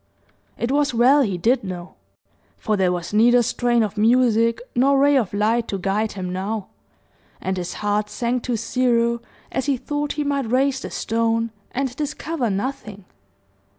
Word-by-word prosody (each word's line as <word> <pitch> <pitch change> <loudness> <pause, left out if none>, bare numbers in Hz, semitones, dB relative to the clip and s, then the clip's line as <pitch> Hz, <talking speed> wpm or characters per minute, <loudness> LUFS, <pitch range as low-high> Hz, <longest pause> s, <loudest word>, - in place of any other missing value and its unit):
It 235 - -2
was 285 -3 +1
well 260 +5 +5
he 200 -8 0
did 235 +9 +2
know; 180 -2 -7 0.6
for 215 - -1
there 190 -2 +2
was 175 +2 -4
neither 240 +3 +5
strain 240 0 +1
of 215 0 -4
music 230 0 +3 0.2
nor 275 +3 +4
ray 285 +1 +4
of 235 -8 +1
light 220 +3 +1
to 200 - -3
guide 200 +3 -1
him 185 -2 -5
now; 200 +2 -3 0.7
and 190 0 -2
his 180 -1 -4
heart 210 0 0
sank 245 +2 -1
to 245 -2 -1
zero 235 0 +1 0.3
as 265 - -2
he 275 -2 +2
thought 290 +3 -3
he 300 - -2
might 280 -4 -1
raise 265 +2 +2
the - - -6
stone 230 0 0 0.2
and 260 -1 -2
discover 300 -3 -2
nothing. 205 -1 -4
235 Hz, 165 wpm, -22 LUFS, 210-260 Hz, 0.7 s, well